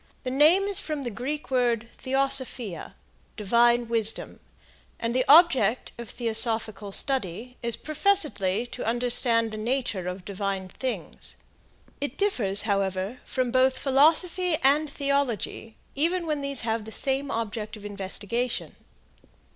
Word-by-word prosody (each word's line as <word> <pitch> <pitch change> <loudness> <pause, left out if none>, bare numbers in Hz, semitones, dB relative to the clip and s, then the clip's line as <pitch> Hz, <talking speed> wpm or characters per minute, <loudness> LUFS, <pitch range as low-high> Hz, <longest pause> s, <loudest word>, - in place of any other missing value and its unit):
The 255 - -3
name 310 +8 +5
is 400 -1 +1
from 305 -3 -4
the 240 - -4
Greek 275 +7 -5
word 240 -3 +1
theosophia 260 -7 -2 0.4
divine 235 +3 +3
wisdom 225 -1 +1 0.6
and 230 +1 -2
the 255 - +3
object 290 -6 +5
of 235 -3 -7
theosophical 220 -3 -1
study 250 -1 -1
is 235 -2 0
professedly 300 - +1
to - - -6
understand 235 -1 +2
the 215 - -6
nature 230 -5 -2
of 180 0 -6
divine 195 -1 -4
things. 255 +6 -5 0.7
It 285 -1 -4
differs, 215 - 0
however, 195 +2 -1
from 255 -2 -2
both 260 +1 +3
philosophy 320 +5 +3
and 290 +3 +3
theology 275 -6 -2 0.2
even 340 +5 0
when 305 -3 -2
these 280 -2 +3
have 225 -1 -2
the 220 - -8
same 270 +3 0
object 220 -2 -4
of 210 - -12
investigation. 205 +4 -3
240 Hz, 130 wpm, -26 LUFS, 215-275 Hz, 0.7 s, name